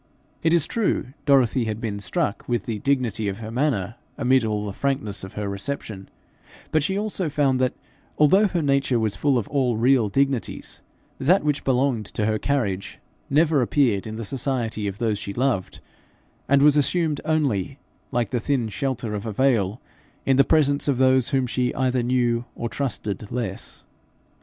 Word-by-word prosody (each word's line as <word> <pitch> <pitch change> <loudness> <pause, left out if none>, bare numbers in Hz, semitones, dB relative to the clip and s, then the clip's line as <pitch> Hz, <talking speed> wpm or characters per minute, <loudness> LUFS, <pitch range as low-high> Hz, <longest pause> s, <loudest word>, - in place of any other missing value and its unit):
It 160 - +2
is 170 -3 +3
true, 200 - -1
Dorothy 130 -3 +4
had 110 -1 -3
been 105 -3 -3
struck 100 +4 -2
with 120 -4 0
the 110 -3 -3
dignity 125 -6 0
of 100 -1 -3
her 110 0 -7
manner 120 -5 -1 0.2
amid 130 0 +3
all 105 -1 -1
the 100 - -4
frankness 135 -6 -2
of 95 - -8
her 105 -1 -3
reception, 100 -1 -5 0.6
but 155 - +3
she 190 +7 -1
soon 190 -5 -2
found 140 -3 +1
that, 130 - +1 0.4
although 190 +8 +5
her 175 -4 -1
nature 140 -3 +2
was 110 -2 0
full 140 -3 +2
of 115 - -2
all 130 -5 +1
real 120 -2 +3
dignities, 135 +2 -1 0.4
that 175 +7 +3
which 150 -1 0
belonged 125 -5 +1
to 105 - -2
her 110 0 0
carriage 105 -10 -1 0.3
never 150 0 +3
appeared 120 -5 +1
in 110 - -6
the 115 0 -5
society 120 -4 -2
of 100 0 -4
those 110 -3 -1
she 100 - -5
loved, 120 -7 -1 0.7
and 140 0 +5
was 150 0 +6
assumed 155 0 +1
only, 140 -6 0 0.3
like 120 -4 -1
the 125 - 0
thin 120 -2 -1
shelter 120 -1 -3
of 105 +1 -4
a - - -2
veil, 110 -3 +1 0.5
in 135 - +3
the 135 - +6
presence 145 -1 +2
of 140 -3 +2
those 130 -1 +3
whom 135 -2 +1
she 125 0 -1
either 130 -1 +1
knew 120 -1 +1
or 115 - -3
trusted 105 -7 -3
less. 115 -6 -5
125 Hz, 175 wpm, -23 LUFS, 110-140 Hz, 0.7 s, was